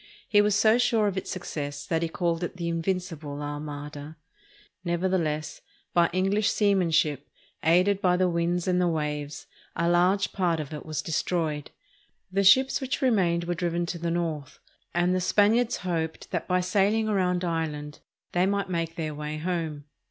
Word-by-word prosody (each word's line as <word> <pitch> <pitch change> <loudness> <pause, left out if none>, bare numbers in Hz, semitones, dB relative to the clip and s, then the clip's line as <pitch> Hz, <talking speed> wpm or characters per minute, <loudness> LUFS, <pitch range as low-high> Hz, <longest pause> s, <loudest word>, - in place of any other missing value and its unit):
He 205 -2 +5
was 205 -1 +2
so 220 +3 +4
sure 225 -3 +3
of 200 -2 0
its 190 - -4
success 145 -5 -5
that 165 -1 0
he 165 - -1
called 170 0 -1
it 175 - -4
the 170 -1 -3
"Invincible 165 -4 -3
Armada." 145 +1 -6 0.7
Never 175 +1 0
theless, 155 -5 -1 0.3
by 170 -1 +4
English 195 +4 +1
seamanship, 165 - +2 0.3
aided 185 +4 +3
by 180 -1 +3
the 185 0 +3
winds 170 +1 0
and 180 0 +2
the 180 - +3
waves, 150 -2 -3 0.3
a 170 0 0
large 180 +3 +3
part 175 -4 +1
of 155 0 -5
it 150 - -7
was 155 -1 -3
destroyed. 160 -3 -1 0.6
The 195 +1 +1
ships 260 +9 +5
which 265 +1 -2
remained 180 -9 +2
were 175 +1 -1
driven 175 -1 -1
to 170 0 -5
the 170 +1 -2
north, 160 -4 -3 0.3
and 175 +1 +2
the 185 - +1
Spaniards 220 +6 +3
hoped 165 -3 -3
that - - -2
by 180 0 +2
sailing 205 +4 +2
around 180 -3 +1
Ireland 150 -3 -3 0.3
they 180 +1 +2
might 200 -1 -1
make 165 -1 -2
their 155 -2 -3
way 150 +1 -5
home. 160 -3 -3
175 Hz, 170 wpm, -27 LUFS, 155-190 Hz, 0.7 s, He